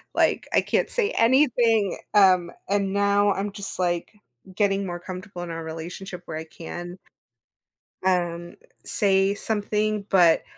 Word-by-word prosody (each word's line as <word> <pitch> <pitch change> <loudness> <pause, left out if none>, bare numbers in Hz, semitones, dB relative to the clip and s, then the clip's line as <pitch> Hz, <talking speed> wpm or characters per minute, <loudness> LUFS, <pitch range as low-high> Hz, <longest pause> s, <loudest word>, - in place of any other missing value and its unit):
Like, - - +2
"I - - +5
can't - - 0
say 450 -4 +1
anything." 230 -5 +3 0.2
Um, 185 -4 +5 0.2
and 200 -1 0
now 200 0 +3
I'm 200 +1 -3
just 200 0 -4
like, 175 +2 -1 0.4
getting 200 -1 +1
more 175 -1 -5
comfortable 185 0 -8
in 170 - -7
our 165 0 -5
relationship 175 +3 -7
where 155 - -6
I 160 - -6
can 175 +2 -8 1.1
um, 175 -2 -1 0.3
say 195 -2 +2
something, 210 0 -1
but 175 -4 +5
195 Hz, 135 wpm, -24 LUFS, 175-205 Hz, 1.1 s, I